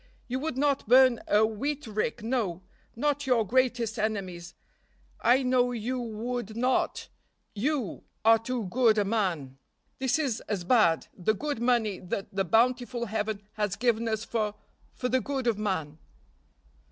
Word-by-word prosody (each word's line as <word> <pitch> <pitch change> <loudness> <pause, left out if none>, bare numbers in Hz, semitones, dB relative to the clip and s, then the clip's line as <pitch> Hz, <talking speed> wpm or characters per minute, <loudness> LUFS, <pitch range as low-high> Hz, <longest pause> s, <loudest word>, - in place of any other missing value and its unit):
You 255 +1 -2
would 295 -2 -3
not 280 -3 +1
burn 255 0 +6
a 210 +1 +4
wheat 275 +7 -3
rick, 215 +1 -2
no, 220 -7 -1 0.3
not 290 +3 -1
your 240 -4 +3
greatest 240 -1 +1
enemy's; 185 -5 -3 0.7
I 250 +4 +4
know 250 -1 +2
you 245 +2 -3
would 230 -1 -4
not, 250 +2 0 0.5
you, 250 - -2 0.2
are 225 0 +7
too 240 +1 -3
good 220 +3 +3
a 205 - +2
man. 175 - -1 0.4
This 265 +2 +1
is 270 -8 -1
as 200 -4 -1
bad; 175 -5 +3
the 215 +4 0
good 290 +1 -3
money 235 -5 +1
that 190 +2 -5
the 195 0 +1
bountiful 240 +5 +1
Heaven 215 -1 -3
has 210 -3 -1
given 230 0 +1
us 220 0 -2
for 215 -2 -1 0.4
for 250 - -2
the 260 +1 +1
good 270 +2 -3
of 230 -3 +1
man." 160 -7 -2
225 Hz, 150 wpm, -28 LUFS, 210-250 Hz, 0.7 s, are